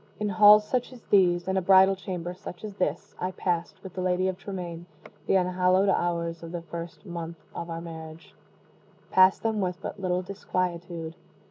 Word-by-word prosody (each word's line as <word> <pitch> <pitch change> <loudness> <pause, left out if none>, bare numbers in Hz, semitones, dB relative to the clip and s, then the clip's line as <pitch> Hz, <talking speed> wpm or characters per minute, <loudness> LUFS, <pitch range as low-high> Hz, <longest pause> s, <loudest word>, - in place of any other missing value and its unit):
In 210 -1 -1
halls 210 +2 +7
such 250 +1 -1
as 250 -3 -13
these 175 -3 +4
in 190 0 0
a - - +2
bridal 190 +1 +6
chamber 180 -2 -5
such 180 -1 -10
as 210 -1 -6
this 170 -3 -2
I 180 - -1
passed, 180 0 -3
with 190 -2 -9
the 185 - -4
Lady 185 0 +1
of 190 - -1
Tremaine, 180 -3 -7 0.4
the - - +3
unhallowed 185 +1 +3
hours 170 -2 0
of 165 -1 -8
the 175 -1 -5
first 170 +3 -8
month 170 -2 -6 0.2
of 170 - -6
our 165 0 -4
marriage 160 -1 -10 0.8
passed 185 0 +5
them 220 -2 0
with 180 -1 -2
but - - -6
little 180 -1 -1
disquietude. 175 -3 -3
180 Hz, 185 wpm, -27 LUFS, 170-190 Hz, 0.8 s, halls